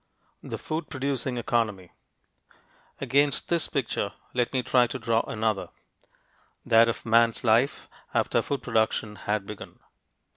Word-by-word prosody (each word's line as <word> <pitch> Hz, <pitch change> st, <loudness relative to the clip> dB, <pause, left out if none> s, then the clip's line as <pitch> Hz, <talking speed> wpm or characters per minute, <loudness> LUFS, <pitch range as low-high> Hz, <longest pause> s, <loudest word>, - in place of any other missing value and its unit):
THE -, -, -5 dB
FOOD 155 Hz, 0 st, -4 dB
PRODUCING 130 Hz, -3 st, -2 dB
ECONOMY 110 Hz, -6 st, -1 dB, 1.1 s
Against 140 Hz, +1 st, +1 dB
this 170 Hz, -2 st, +2 dB
picture 115 Hz, -7 st, -2 dB, 0.2 s
let 125 Hz, -1 st, 0 dB
me 130 Hz, -2 st, 0 dB
try 125 Hz, -1 st, +4 dB
to 130 Hz, -, -5 dB
draw 115 Hz, -1 st, +1 dB
another 110 Hz, -2 st, -1 dB, 1.0 s
that 115 Hz, -1 st, +6 dB
of 115 Hz, -, -4 dB
man's 115 Hz, 0 st, +3 dB
life 120 Hz, +4 st, +2 dB, 0.2 s
after -, -, +1 dB
food 140 Hz, -, -3 dB
production 110 Hz, -2 st, 0 dB
had 105 Hz, -1 st, -2 dB
begun. 105 Hz, 0 st, -9 dB
115 Hz, 125 wpm, -27 LUFS, 110-130 Hz, 1.1 s, that